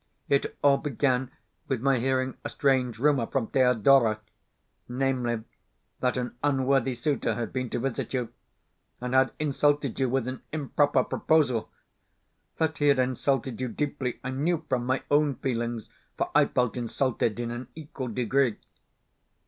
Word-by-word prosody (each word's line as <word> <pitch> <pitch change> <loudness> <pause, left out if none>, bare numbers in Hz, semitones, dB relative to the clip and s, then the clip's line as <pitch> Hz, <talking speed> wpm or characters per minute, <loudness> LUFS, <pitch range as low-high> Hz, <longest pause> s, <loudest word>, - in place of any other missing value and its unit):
It 140 - +1
all 140 -1 +6
began 130 -2 0 0.4
with 130 - -1
my 135 +1 +2
hearing 130 +1 0
a - - -4
strange 130 -4 +1
rumour 135 -2 +2
from 135 -4 -1
Thedora 125 -3 +4 0.7
namely, 125 -3 -1 0.6
that 125 0 0
an 125 -1 -3
unworthy 135 -2 +2
suitor 140 +3 -1
had 120 -1 -4
been 130 -1 -2
to - - -2
visit 125 0 -3
you, 125 -3 -2 0.7
and 125 0 -4
had 130 0 +4
insulted 145 -3 +1
you 130 -1 +2
with 130 -1 0
an 130 0 -5
improper 145 -3 +2
proposal. 140 -8 +1 0.9
That 160 -1 0
he 145 - +3
had 140 -1 +5
insulted 130 -1 0
you 130 - 0
deeply 135 -1 -3
I 130 - -3
knew 155 +5 -1
from 125 -2 -1
my 130 +1 0
own 145 -1 +3
feelings, 120 -3 -3 0.3
for - - -1
I - - +6
felt 125 -1 0
insulted 120 -2 -1
in 120 -1 -2
an 120 +1 -6
equal 145 -4 -6
degree. 125 +1 +1
130 Hz, 150 wpm, -27 LUFS, 120-140 Hz, 0.9 s, all